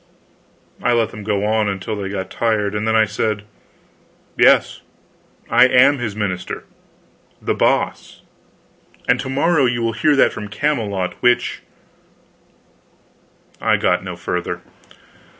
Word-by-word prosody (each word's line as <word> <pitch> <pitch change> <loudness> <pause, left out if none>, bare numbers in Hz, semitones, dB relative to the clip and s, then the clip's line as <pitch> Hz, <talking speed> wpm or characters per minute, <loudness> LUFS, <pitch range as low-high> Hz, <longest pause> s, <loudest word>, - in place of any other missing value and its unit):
I 120 - +2
let 115 -1 +1
them 105 - -9
go 105 -1 -1
on 110 -1 +1
until 100 +2 -4
they 100 -2 -4
got 95 -1 -5
tired, 105 -3 0
and 105 +1 -2
then 110 - +2
I 110 -1 +5
said: 105 0 -2 0.9
"Yes, - - +4 0.7
I 130 - +5
am 130 +3 +4
his 110 -4 -4
minister, 95 -4 -4 0.8
The - - -1
Boss; - - -1 0.8
and - - +3
to - - -4
morrow 145 +1 +2
you 120 -1 -1
will 115 0 0
hear 145 +6 +2
that 135 - +4
from 105 - -6
Camelot 105 -6 -1
which 120 0 +1 1.4
" - - -35
I - - +3
got 90 0 +1
no 90 -2 -6
further. 90 +1 -4
110 Hz, 135 wpm, -19 LUFS, 100-120 Hz, 1.4 s, I